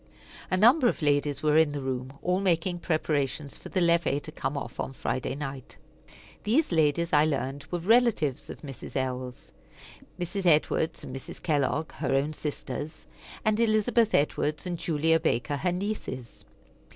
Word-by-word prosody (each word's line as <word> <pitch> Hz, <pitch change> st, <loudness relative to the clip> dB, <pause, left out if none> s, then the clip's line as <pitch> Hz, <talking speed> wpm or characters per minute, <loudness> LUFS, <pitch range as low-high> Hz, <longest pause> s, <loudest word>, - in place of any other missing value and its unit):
A 185 Hz, -, +1 dB
number 245 Hz, -, +6 dB
of 200 Hz, -, -1 dB
ladies 145 Hz, -1 st, +1 dB
were 150 Hz, 0 st, +4 dB
in 155 Hz, -2 st, +3 dB
the 145 Hz, -, -3 dB
room, 130 Hz, +1 st, -4 dB
all 180 Hz, +1 st, +1 dB
making 175 Hz, -1 st, +1 dB
preparations 150 Hz, -4 st, -1 dB
for -, -, -11 dB
the 185 Hz, -, 0 dB
levee 170 Hz, -4 st, +3 dB
to -, -, -9 dB
come 135 Hz, +2 st, -3 dB
off 120 Hz, -3 st, -6 dB
on 135 Hz, -, -3 dB
Friday 130 Hz, 0 st, -2 dB
night. 135 Hz, -3 st, -7 dB, 0.7 s
These 250 Hz, +7 st, +2 dB
ladies, 160 Hz, +1 st, +2 dB
I 150 Hz, 0 st, +6 dB
learned, 140 Hz, -1 st, -2 dB
were 175 Hz, -, -1 dB
relatives 195 Hz, -, +2 dB
of -, -, -8 dB
Mrs. 135 Hz, -3 st, -9 dB
L.'s, 130 Hz, -1 st, -3 dB, 0.7 s
Mrs. 180 Hz, +2 st, -2 dB
Edwards 160 Hz, +1 st, +2 dB
and 130 Hz, -, -7 dB
Mrs. 135 Hz, -, -9 dB
Kellogg, 150 Hz, 0 st, 0 dB
her 135 Hz, -3 st, -1 dB
own 145 Hz, +3 st, +1 dB
sisters, 150 Hz, 0 st, -5 dB, 0.4 s
and 215 Hz, 0 st, +2 dB
Elizabeth 225 Hz, 0 st, +3 dB
Edwards 150 Hz, +2 st, 0 dB
and 180 Hz, -1 st, -2 dB
Julia 160 Hz, 0 st, +2 dB
Baker, 145 Hz, -2 st, 0 dB
her 180 Hz, +5 st, 0 dB
nieces. 180 Hz, -, -5 dB
155 Hz, 160 wpm, -28 LUFS, 140-180 Hz, 0.7 s, number